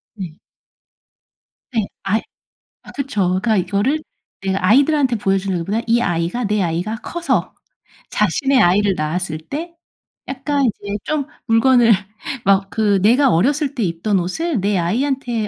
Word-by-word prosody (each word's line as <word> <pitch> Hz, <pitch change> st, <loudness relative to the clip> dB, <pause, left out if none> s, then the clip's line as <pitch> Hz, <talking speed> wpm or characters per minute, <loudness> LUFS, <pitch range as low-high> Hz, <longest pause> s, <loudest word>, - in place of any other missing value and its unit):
네. 180 Hz, -6 st, -6 dB, 1.4 s
네. 220 Hz, -4 st, +1 dB, 0.2 s
아예 205 Hz, +3 st, +1 dB, 0.6 s
아 -, -, -13 dB
그쵸. 275 Hz, -7 st, -3 dB
그러니까 190 Hz, +5 st, +1 dB
이거를 210 Hz, -, 0 dB, 0.4 s
내가 190 Hz, -1 st, -2 dB
아이들한테 275 Hz, +2 st, +4 dB
보여주는 195 Hz, -2 st, 0 dB
것보다 205 Hz, +7 st, -1 dB
이 235 Hz, +1 st, +3 dB
아이가, 175 Hz, +3 st, -1 dB
내 210 Hz, 0 st, 0 dB
아이가 175 Hz, +6 st, -2 dB
커서 270 Hz, -, -1 dB, 0.6 s
자신의 270 Hz, -2 st, +2 dB
아이를 195 Hz, +3 st, +3 dB
낳았을 155 Hz, +1 st, -2 dB
때 315 Hz, -, -6 dB, 0.5 s
약간 275 Hz, +1 st, -1 dB
이제 205 Hz, -2 st, -3 dB
좀 305 Hz, -2 st, -1 dB, 0.2 s
물건을 235 Hz, 0 st, +5 dB, 0.5 s
막 195 Hz, 0 st, +3 dB
그 205 Hz, -3 st, +1 dB
내가 250 Hz, +6 st, +4 dB
어렸을 280 Hz, -, +1 dB
때 240 Hz, -, -1 dB
입던 185 Hz, +3 st, 0 dB
옷을 245 Hz, -, -2 dB
내 200 Hz, -1 st, +1 dB
아이한테 235 Hz, +4 st, -1 dB
215 Hz, 285 characters per minute, -19 LUFS, 190-265 Hz, 1.4 s, 물건을